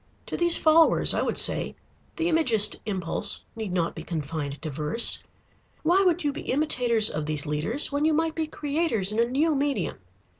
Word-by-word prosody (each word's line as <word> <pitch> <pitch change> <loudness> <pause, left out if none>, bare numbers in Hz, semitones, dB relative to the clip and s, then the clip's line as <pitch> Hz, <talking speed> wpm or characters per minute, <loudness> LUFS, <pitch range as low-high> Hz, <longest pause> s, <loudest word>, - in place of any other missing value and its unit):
To - - -6
these 345 -1 +4
followers 320 +1 +4
I - - 0
would - - -2
say: - - +1 0.4
the 330 - -1
Imagist 240 -11 +4
impulse 190 0 -2
need 220 -4 -5
not 175 -2 -1
be 160 - -8
confined 155 -3 -5
to 155 - -4
verse. 150 - +2 0.6
Why 350 +5 +3
would 355 -2 +1
you 290 -1 -1
be - - -7
imitators 250 -6 +1
of 155 0 -4
these 150 -1 0
leaders 155 - -1
when 285 +2 -1
you 315 - +2
might 325 0 0
be 320 -1 -3
creators 290 - -2
in 215 - -3
a 235 - +4
new 290 +6 0
medium? 280 0 -2
240 Hz, 185 wpm, -25 LUFS, -, 0.6 s, these